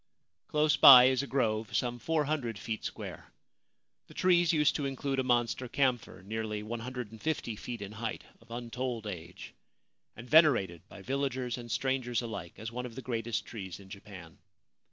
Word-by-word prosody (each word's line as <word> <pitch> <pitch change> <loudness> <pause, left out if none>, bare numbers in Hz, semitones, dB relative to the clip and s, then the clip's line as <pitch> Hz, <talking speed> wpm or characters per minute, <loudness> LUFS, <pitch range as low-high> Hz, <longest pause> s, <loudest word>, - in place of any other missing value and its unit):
Close 150 0 +2
by 130 -3 +11
is 130 0 +3
a 140 - -5
grove 110 -5 -1
some 120 -1 -1
400 150 -7 -1
feet 110 +1 -5
square. - - -7 0.8
The - - -16
trees 175 -2 +4
used 150 -3 +3
to 145 -2 -2
include 135 0 -2
a - - +1
monster 120 0 0
camphor 125 -8 -1
nearly 105 0 -4
150 120 +2 -4
feet 115 0 -6
in 100 - -8
height, 110 +1 -5 0.2
of 115 - -23
untold 120 0 -4
age, 90 -3 -8 0.6
and 120 +3 -10
venerated 115 - +4
by 100 - -12
villagers 130 -1 -2
and 120 -1 -9
strangers 130 -3 -1
alike 100 -7 -6
as 110 +1 -6
one 125 +1 -4
of 115 - -12
the 130 - -7
greatest 115 -2 -2
trees 95 -6 -7
in 95 -1 -14
Japan. 95 -5 -11
120 Hz, 160 wpm, -31 LUFS, 110-130 Hz, 0.8 s, by